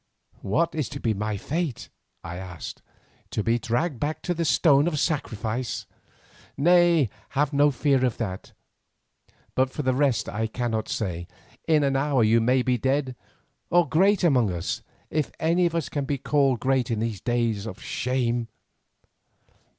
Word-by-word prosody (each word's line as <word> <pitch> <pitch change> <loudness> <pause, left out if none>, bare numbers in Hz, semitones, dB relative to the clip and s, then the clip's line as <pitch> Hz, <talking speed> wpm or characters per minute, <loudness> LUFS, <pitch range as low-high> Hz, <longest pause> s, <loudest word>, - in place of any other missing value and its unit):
"What 165 +13 0
is 155 -5 -2
to 140 - -6
be 115 -4 0
my 105 0 -2
fate?" 155 - -3 0.3
I 85 +1 -6
asked. 90 -2 -8 0.5
"To 105 - -2
be 115 +2 +2
dragged 120 +5 -1
back 150 +2 -3
to 180 - 0
the 170 -1 -2
stone 145 -1 +4
of 165 -3 -1
sacrifice?" 125 - -2 0.7
"Nay, 170 - +4 0.3
have 145 0 +2
no 145 +1 +5
fear 135 -1 +1
of 125 -3 0
that. 100 -5 -5 1.0
But 130 0 +2
for 150 - -5
the 130 0 +2
rest 130 -6 +1
I 110 +1 -2
cannot 110 -1 -2
say. 85 -5 -3 0.4
In 155 -2 +4
an 135 -1 +1
hour 135 -3 +2
you 115 +2 +4
may 125 +2 +3
be 125 -1 +1
dead 135 +1 0 0.5
or 175 -1 +4
great 195 +4 +3
among 125 - +3
us, 85 0 -3 0.3
if 155 -2 -1
any 170 +2 +3
of 170 - -4
us 165 -4 -1
can 145 -2 -3
be 140 0 -1
called 135 -3 +2
great 130 -2 +1
in 115 - 0
these 110 -3 -3
days 115 -3 0
of 100 -3 -7
shame. 120 -1 -1
130 Hz, 165 wpm, -25 LUFS, 115-150 Hz, 1.0 s, no